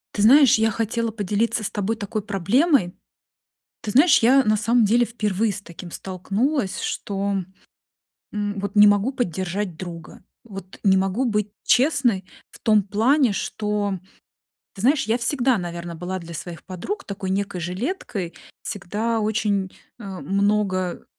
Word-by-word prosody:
Ты 205 - 0
знаешь, 255 +1 +7
я 220 - +3
хотела 230 +1 -1
поделиться 215 +1 -1
с - - -3
тобой 205 +2 -1
такой 210 -1 -4
проблемой. 205 - +2 0.9
Ты 210 - -4
знаешь, 295 - +6
я 265 +4 +5
на 215 -2 +2
самом 235 +3 +3
деле 235 +3 +3
впервые 215 -2 -1
с 190 - -7
таким 175 -1 -10
столкнулась, 195 - -2
что, 200 0 -2 1.0
м, 205 -1 -3
вот 200 0 -4
не 210 0 +8
могу 205 +5 +3
поддержать 185 - -3
друга. 170 -3 -9 0.2
Вот 195 -4 -10
не 190 -1 +5
могу 195 +7 0
быть 210 -3 0
честной 250 - +2 0.2
в - - -15
том 215 -2 +3
плане, 230 +6 +2
что 205 0 -2 0.8
ты 195 - -10
знаешь, 270 +6 +3
я 225 +3 +1
всегда, 250 +1 +1
наверное, 170 -1 -5
была 180 +3 -4
для 170 -1 -10
своих 170 0 -7
подруг 290 - -5
такой 195 -1 -5
некой 195 -1 -2
жилеткой, 190 - -4 0.3
всегда 210 +4 -2
очень, 210 -3 0 0.3
а, 195 -4 -7
много 195 -2 0
205 Hz, 145 wpm, -23 LUFS, 190-230 Hz, 1.0 s, не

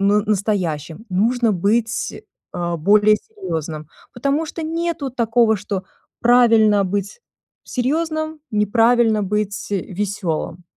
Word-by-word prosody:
н 205 +1 +3
настоящим, 190 -4 -2
нужно 230 +5 +2
быть, 220 +5 -1 0.3
а, 175 -1 -2
более 210 +5 +4
серьёзным, 160 - -6 0.3
потому 280 +6 0
что 325 - -6
нету 330 -3 -2
такого, 230 -2 +2
что 195 -1 -4 0.4
правильно 225 -4 +5
быть 200 - -3 0.4
серьёзным, 315 +4 -2
неправильно 225 +1 +3
быть, 205 0 -2
э, 195 - +1
весёлым. 180 -3 -3
215 Hz, 105 wpm, -20 LUFS, 195-245 Hz, 0.4 s, правильно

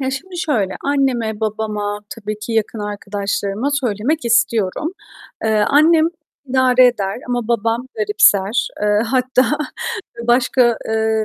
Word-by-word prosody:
Ya, 265 -1 -1
şimdi 355 +8 -6
şöyle. 225 - 0
Anneme, 250 -6 0
babama 210 -1 -2
tabii 215 -2 -6
ki 215 +2 -6
yakın 220 0 -1
arkadaşlarıma 205 +2 -3
söylemek 245 +5 -1
istiyorum. 235 - +1 0.5
Eee, 220 - +2 0.2
annem 315 +3 +5 0.4
idare 255 -1 +4
eder 200 -5 -1
ama 245 -2 -2
babam 230 +1 0
garipser. 210 0 +3
Eee, 210 0 +2
hatta 255 +3 +1 0.7
başka, 240 -1 +3
eee, 220 0 +1
230 Hz, 115 wpm, -18 LUFS, 210-255 Hz, 0.7 s, annem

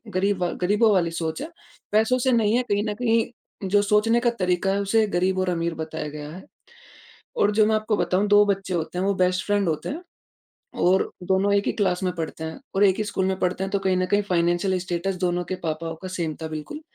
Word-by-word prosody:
गरीब 195 0 +1
वा 175 - +1
गरीबों 210 +4 +3
वाली 170 -3 +2
सोच 160 -1 -3
है। 315 - -5 0.4
पैसों 220 +4 +3
से 260 +1 +2
नहीं 225 -1 +3
है 250 - +1
कहीं 205 +1 +2
न - - -1
कहीं 230 -4 -2
जो 205 +1 +4
सोचने 210 +3 +3
का 240 - +3
तरीका 180 +1 +1
है 200 - 0
उसे 215 +2 +2
गरीब 185 +1 +1
और 185 -1 0
अमीर 170 -1 -1
बताया 160 -1 -5
गया 150 0 -7
है। 185 +3 -10 0.9
और 205 - +3
जो 215 0 +4
मैं 220 - +2
आपको 215 0 0
बताऊँ, 195 +3 +1
दो 205 0 +6
बच्चे 195 -2 -1
होते 170 +1 -3
हैं 190 - 0
वो 200 - +2
बेस्ट 185 0 +1
फ़्रेंड 205 -2 +1
होते 155 - -3
हैं 315 +5 -5 0.8
और 185 +2 +3
दोनों 190 +2 +2
1 200 - +1
ही - - +1
क्लास 190 -3 0
में 180 - 0
पढ़ते 160 -1 -5
हैं 160 +11 -6 0.2
और 205 - +5
1 190 -1 +4
ही 215 - 0
स्कूल 195 -2 -2
में 190 0 -1
पढ़ते 185 +1 0
हैं 195 - -4
तो 200 - +2
कहीं 190 -1 +1
न 185 - +1
कहीं 205 +2 +2
फ़ायनैन्शल 180 0 +1
स्टैटस 180 +1 -2
दोनों 175 0 0
के 185 - -4
पापाओं 165 +1 -3
का 185 - -5
सेम 170 -4 -3
था 160 - -3
बिल्कुल। 155 - -6
190 Hz, 235 wpm, -24 LUFS, 175-205 Hz, 0.9 s, दो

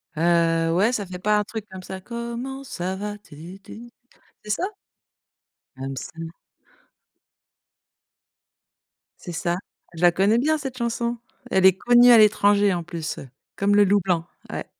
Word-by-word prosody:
Heu, 165 0 +2
ouais, 210 +6 +3
ça 210 -5 -2
fait 180 0 -8
pas 210 +2 +2
un - - 0
truc 220 0 -6
comme 185 -1 -9
ça, 190 0 -7
comment 235 +4 -6
ça 185 -3 -4
va, 210 +1 -5
tu 175 0 -12
tu. 240 +2 -11 0.5
C'est 210 - -10
ça? 340 - -2 1.2
Comme 135 0 -5
ça. 165 +4 -7 2.9
C'est 175 - -7
ça, 175 +1 -1 0.4
je 165 - -8
la 175 -1 +6
connais 200 +6 +2
bien 310 +4 +2
cette 270 -3 -6
chanson. 235 0 -1 0.4
Elle 190 0 +5
est 190 0 +4
connue 245 +2 +6
à 235 - +9
l'étranger 205 -2 +4
en 175 - -2
plus, 165 -2 -5
heu, 130 - -11 0.3
comme 200 +1 +2
le 205 - +6
loup 205 +1 +3
blanc. 170 -3 0 0.3
Ouais. - - -4
200 Hz, 160 wpm, -23 LUFS, 175-235 Hz, 2.9 s, à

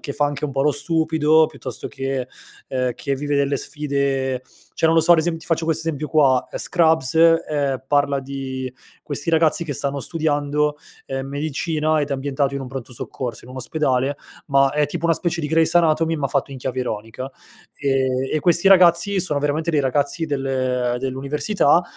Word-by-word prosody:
che 140 - -5
fa 145 +1 +1
anche 145 +1 -4
un 145 - -2
po' 135 0 0
lo 150 0 +3
stupido 160 0 +2
piuttosto 130 -3 -7
che, 135 -2 -3 0.4
ehm, 125 -1 -1
che 140 -3 -2
vive 145 +1 -2
delle 140 0 +1
sfide 140 -3 -2 0.3
cioè, 160 - +2
non 165 - +3
lo 165 - +5
so, 175 +2 +6
ad 165 - +5
esem 165 +1 0
ti 160 - -11
faccio 165 -1 0
questo 160 0 0
esempio 150 -2 -2
qua: 135 -4 +4
Scrubs, 160 -6 +2
ehm, 150 -5 +2
parla 140 -1 +2
di 130 -1 -5 0.3
questi 145 +1 -4
ragazzi 160 0 +3
che 150 - -4
stanno 140 +1 -2
studiando, 150 -1 0 0.3
ehm, 135 0 -4
medicina, 155 +2 -1
ed 145 - -2
è - - 0
ambientato 140 0 -1
in 140 - -3
un - - -7
pronto 130 -1 -7
soccorso, 120 0 -6
in 125 - -13
un 130 - -10
ospedale 135 -1 0 0.3
ma 135 -1 +3
è 150 0 +1
tipo 170 +2 -5
una 165 0 +3
specie 170 +1 -1
di 150 - -2
Grey's 160 0 +3
anatomy, 165 -1 +3
ma 145 -2 -1
fatto 140 +1 -1
in 135 - -7
chiave 130 0 -3
ironica, 115 +2 -5 0.4
ehm, 135 -2 0
e 155 - +1
questi 170 +2 +3
ragazzi 185 +1 +5
sono 150 -5 0
veramente 150 +3 -1
dei 150 - +2
ragazzi 145 +4 0
del 130 -3 -1
dell'università, 140 - +1
145 Hz, 190 wpm, -21 LUFS, 135-160 Hz, 0.4 s, so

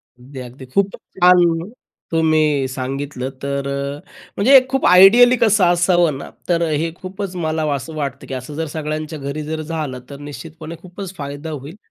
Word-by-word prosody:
अगदी 130 +2 -11
अगदी. 125 +1 -10
खूप 195 +10 0 0.3
छान 175 0 +4 0.4
तुम्ही 155 -4 +2
सांगितलं. 130 0 -4
तर 140 0 -2
अ, 140 +1 -3 0.4
म्हणजे 265 +7 +7
खूप 270 0 0
आयडियली 225 +7 +8
कसं 215 -3 +3
असावं 175 -3 +3
ना. - - -8 0.2
तर 170 -1 +2
हे 155 +2 -1
खूपच 190 0 -6
मला 160 -2 -1
असं 140 +3 -5
वाटतं, 140 -2 -4
की - - -6
असं 130 +3 -6
जर 160 +1 -2
सगळ्यांच्या 155 0 -4
घरी 140 +2 -4
जर 155 +1 -4
झालं 155 -5 -4
तर 140 - -8
निश्चितपणे 160 +2 -9
खूपच 185 +1 -8
फायदा 145 0 -6
होईल. 145 +3 -7
155 Hz, 160 wpm, -19 LUFS, 140-175 Hz, 0.4 s, आयडियली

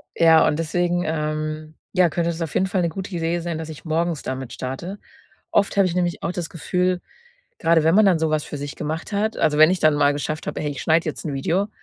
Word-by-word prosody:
Ja, 165 -1 +6
und 150 - +1
deswegen, 175 +2 0
ähm 155 0 -3 0.2
ja, 180 -2 +5
könnte 170 +2 0
es 165 0 -6
auf 165 -3 -3
jeden 190 - +3
Fall 190 -1 0
'ne 170 - +1
gute 190 +4 -6
Idee 165 0 0
sein, 170 -1 -3
dass 160 -1 -6
ich 155 +1 -10
morgens 165 -1 -1
damit 130 -1 -5
starte. 150 +10 -5 0.5
Oft 200 0 +1
habe 195 - +5
ich 175 - -3
nämlich 175 -1 -1
auch - - -1
das 175 -2 -4
Gefühl, 180 +2 -1 0.6
grade 165 -1 +3
wenn 165 +2 +4
man 215 +2 +6
dann 180 -4 +4
sowas 155 -1 0
für 145 - -6
sich 145 +1 -6
gemacht 160 +7 -4
hat 215 +2 0
also, 150 -1 +2
wenn 155 +2 +8
ich 185 - 0
dann 155 -1 +4
mal 145 0 +3
geschafft 150 +2 -4
habe: - - -3
„Hey, 150 - -2
ich 140 -3 -6
schneide 165 +1 +2
jetzt 155 - -6
'n 150 - -2
Video.“ 175 +9 0
165 Hz, 245 wpm, -22 LUFS, 155-175 Hz, 0.6 s, wenn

